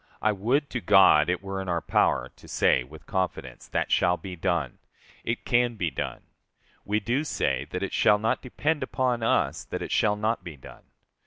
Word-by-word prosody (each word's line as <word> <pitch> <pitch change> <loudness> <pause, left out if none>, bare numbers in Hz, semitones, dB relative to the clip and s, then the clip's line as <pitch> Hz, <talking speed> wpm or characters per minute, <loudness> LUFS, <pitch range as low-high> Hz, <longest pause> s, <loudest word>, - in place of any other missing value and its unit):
I 110 - +2
would 125 +9 0
to 125 - -3
God 75 -7 +6
it 90 +2 -1
were 95 0 -4
in 95 - -6
our 85 -1 +1
power - - +1
to - - -17
say 65 - +2
with 75 +5 -14
confidence 95 -3 -3
that - - -2
shall 90 +2 +3
be 95 -1 -8
done! 80 -6 -2 0.4
["It 115 +1 -3
can 120 -1 +2
be 85 -6 -2
done."] - - -5 0.6
We 105 +1 0
do 120 +7 -1
say 155 - -1
that - - -4
it - - -4
shall 105 - +4
not 110 +2 0
depend 145 +4 -1
upon 125 -3 -1
us 115 - +1
that - - -5
it - - -6
shall 105 -1 +2
not 110 +2 -1
be 80 -4 -9
done. 65 - -14
105 Hz, 195 wpm, -26 LUFS, 90-120 Hz, 0.6 s, God